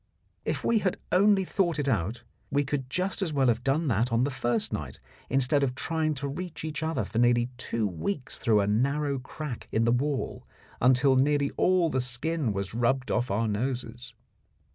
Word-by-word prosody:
If -, -, -2 dB
we 230 Hz, -, +3 dB
had 185 Hz, -3 st, 0 dB
only 195 Hz, +1 st, +4 dB
thought 175 Hz, -3 st, 0 dB
it 145 Hz, -2 st, -1 dB
out, 110 Hz, 0 st, -1 dB, 0.3 s
we 145 Hz, +1 st, +1 dB
could 135 Hz, -2 st, -3 dB
just 185 Hz, +8 st, -1 dB
as 180 Hz, -5 st, 0 dB
well 135 Hz, -3 st, +3 dB
have 120 Hz, +1 st, 0 dB
done 145 Hz, +5 st, +1 dB
that 115 Hz, +2 st, +1 dB
on 115 Hz, +1 st, +2 dB
the 140 Hz, -, 0 dB
first 120 Hz, -3 st, -1 dB
night, -, -, -5 dB, 0.3 s
instead 135 Hz, +2 st, +2 dB
of 130 Hz, -2 st, 0 dB
trying 155 Hz, +1 st, -1 dB
to 140 Hz, +1 st, -3 dB
reach 165 Hz, +3 st, -6 dB
each 155 Hz, -1 st, -4 dB
other 160 Hz, +1 st, -1 dB
for 115 Hz, -, -3 dB
nearly 120 Hz, 0 st, +3 dB
two 115 Hz, -2 st, -2 dB
weeks 100 Hz, -, -3 dB
through 110 Hz, -3 st, +3 dB
a 100 Hz, -, 0 dB
narrow 140 Hz, +6 st, +1 dB
crack 135 Hz, 0 st, -7 dB
in 110 Hz, -, +2 dB
the 115 Hz, -, +3 dB
wall 135 Hz, +3 st, -1 dB, 0.4 s
until 130 Hz, +2 st, +4 dB
nearly 140 Hz, +1 st, +2 dB
all 180 Hz, -3 st, +2 dB
the 130 Hz, -, +1 dB
skin 130 Hz, +2 st, -1 dB
was 100 Hz, 0 st, -3 dB
rubbed 125 Hz, +3 st, 0 dB
off 120 Hz, -, 0 dB
our 110 Hz, +4 st, 0 dB
noses. 120 Hz, +2 st, -3 dB
130 Hz, 190 wpm, -28 LUFS, 120-150 Hz, 0.4 s, only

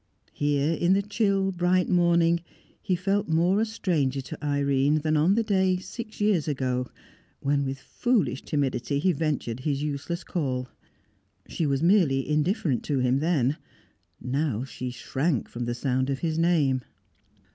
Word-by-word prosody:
Here, 145 Hz, +1 st, +1 dB
in 175 Hz, +2 st, +2 dB
the 200 Hz, +1 st, +2 dB
chill 200 Hz, -2 st, +1 dB
bright 180 Hz, 0 st, +1 dB
morning, 170 Hz, -1 st, +3 dB, 0.4 s
he 185 Hz, -, 0 dB
felt 195 Hz, +3 st, 0 dB
more 175 Hz, +6 st, +3 dB
a -, -, +2 dB
stranger 160 Hz, -11 st, -1 dB
to 135 Hz, -, -9 dB
Irene 140 Hz, +1 st, +2 dB
than 155 Hz, +1 st, +1 dB
on 160 Hz, +6 st, +3 dB
the 230 Hz, -, +2 dB
day, 190 Hz, -3 st, +2 dB
six 215 Hz, +4 st, -8 dB
years 205 Hz, -7 st, +2 dB
ago, 130 Hz, -3 st, -1 dB, 0.5 s
when 140 Hz, 0 st, +1 dB
with 135 Hz, 0 st, -3 dB
foolish 215 Hz, -, 0 dB
timidity 140 Hz, -1 st, -1 dB
he 180 Hz, +6 st, +2 dB
ventured 145 Hz, -7 st, -2 dB
his 140 Hz, +1 st, -1 dB
useless 150 Hz, +4 st, -3 dB
call. 130 Hz, -7 st, -2 dB, 0.8 s
She 160 Hz, -, -2 dB
was 140 Hz, +1 st, 0 dB
merely 170 Hz, -8 st, +3 dB
indifferent 150 Hz, -, +1 dB
to 145 Hz, -, 0 dB
him 130 Hz, +1 st, +2 dB
then; 150 Hz, -3 st, +1 dB, 0.6 s
now 130 Hz, -2 st, -1 dB
she 130 Hz, -1 st, -6 dB
shrank 135 Hz, +2 st, -1 dB
from 120 Hz, 0 st, -5 dB
the 120 Hz, 0 st, -2 dB
sound 130 Hz, +1 st, 0 dB
of 135 Hz, -, 0 dB
his 160 Hz, 0 st, -1 dB
name. 150 Hz, -7 st, +2 dB
150 Hz, 155 wpm, -26 LUFS, 135-180 Hz, 0.8 s, morning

